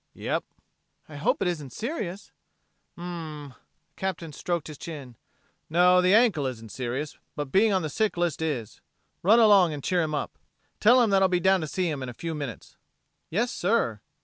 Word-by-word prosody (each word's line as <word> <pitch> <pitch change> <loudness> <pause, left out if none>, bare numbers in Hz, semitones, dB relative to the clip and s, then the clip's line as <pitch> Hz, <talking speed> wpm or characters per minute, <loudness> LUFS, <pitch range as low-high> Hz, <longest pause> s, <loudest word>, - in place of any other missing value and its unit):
"Yep." - - -2 0.6
"I 155 - -11
hope 150 - +1
it - - 0
isn't 150 -7 -3
serious." 210 - -5 0.6
"Hm 170 - -9
m - - -5
m" 155 -5 -6
the 130 - -18 0.4
Captain 170 -5 -4
stroked 170 +2 -2
his 150 -2 -9
chin 140 -7 -8 0.5
"no, 180 +2 +5
the 180 0 +3
ankle 215 - +3
isn't 115 -4 -7
serious, 130 +4 -4 0.2
but 145 -2 -4
being 215 +3 +4
on 190 -3 +1
the - - -1
sick 215 +5 0
list 175 -2 0
is. 140 -9 -3 0.4
Run 215 +6 +5
along 200 -7 +6
and 145 -2 -6
cheer 180 -1 +1
him 155 -2 -1
up. - - -4 0.4
Tell 245 +3 +6
him 220 - +1
that 195 -1 +4
I'll 190 - +5
be 180 -1 +2
down 190 +1 +3
to 155 - -3
see 180 +4 -1
him 150 -4 -3
in 130 - -4
a 120 - -9
few 165 +4 -4
minutes." 140 - -7 0.5
"Yes, 230 +8 0
sir." 180 - 0
170 Hz, 200 wpm, -26 LUFS, 145-190 Hz, 0.6 s, along